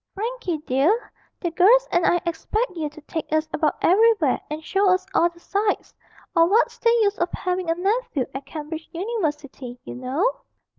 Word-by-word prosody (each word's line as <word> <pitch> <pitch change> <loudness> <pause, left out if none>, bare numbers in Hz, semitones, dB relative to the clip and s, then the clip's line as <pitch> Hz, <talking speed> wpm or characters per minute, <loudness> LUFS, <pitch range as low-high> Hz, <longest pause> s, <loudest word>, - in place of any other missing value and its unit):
Frankie 440 -5 -3
dear, 305 - +1 0.3
the 345 - -2
girls 465 +10 +5
and 345 0 +3
I 350 - +3
expect 365 +6 -2
you 310 -3 -2
to 300 +1 -14
take 320 +1 -5
us 310 0 +1
about 300 -1 +1
everywhere 400 - +4
and 305 +1 -5
show 390 0 +2
us 370 0 +2
all 340 - +4
the 340 0 -20
sights; 405 +3 -1 0.4
or 330 0 +6
what's 440 +6 +2
the 465 - +3
use 405 0 0
of 345 +1 0
having 365 -1 -2
a 330 - +2
nephew 390 - 0
at 270 +1 -7
Cambridge 315 +2 -7
University, 295 - -4
you - - -8
know.' 270 - -1
345 Hz, 180 wpm, -23 LUFS, 305-410 Hz, 0.4 s, or